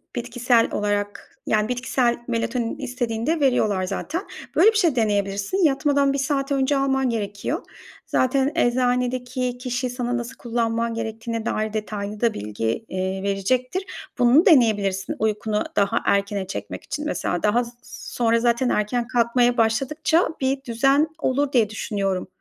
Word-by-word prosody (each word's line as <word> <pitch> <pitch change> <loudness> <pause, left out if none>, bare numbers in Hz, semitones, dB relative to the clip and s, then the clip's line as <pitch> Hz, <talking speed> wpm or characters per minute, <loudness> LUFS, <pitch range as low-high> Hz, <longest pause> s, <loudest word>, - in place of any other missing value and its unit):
bitkisel 240 -1 +1
olarak, 205 0 -3
yani, 215 0 +2
bitkisel 245 -1 0
melatonin 230 0 -2
istediğinde, 250 +3 -2
veriyorlar 215 -8 +2
zaten. 315 - -3 0.3
Böyle 440 - +6
bir 430 - -1
şey 335 -10 +3
deneyebilirsin. 205 - 0
Yatmadan 280 -1 +2
bir - - -1
saat 275 +1 -1
önce 275 +1 +2
alman 270 -1 +1
gerekiyor. 210 - -3 0.4
Zaten 265 +2 +1
eczanedeki 250 0 0
kişi, 250 0 -2
sana 245 0 -2
nasıl 240 +2 -6
kullanman 230 -1 -1
gerektiğine 225 0 -4
dair 215 0 -1
detaylı 210 0 -4
da 235 - +2
bilgi, 110 - -3
eee, 190 +1 -3
verecektir. 250 - -1 0.3
Bunu 250 +7 +5
deneyebilirsin, 205 - +3
uykunu 215 0 0
daha 200 0 +2
erkene 200 -1 0
çekmek - - -6
için 300 0 -5
mesela. 175 - -2
Daha 230 +4 +3
s 235 - -9 0.4
sonra 230 -1 +2
zaten 240 +1 +2
erken 235 +3 0
kalkmaya 240 0 +2
başladıkça, 275 +9 +2
bir 270 +1 0
düzen 270 +6 +2
olur 280 +1 0
diye, 225 -5 +3
düşünüyorum. 195 -4 -2
240 Hz, 135 wpm, -23 LUFS, 215-260 Hz, 0.4 s, Böyle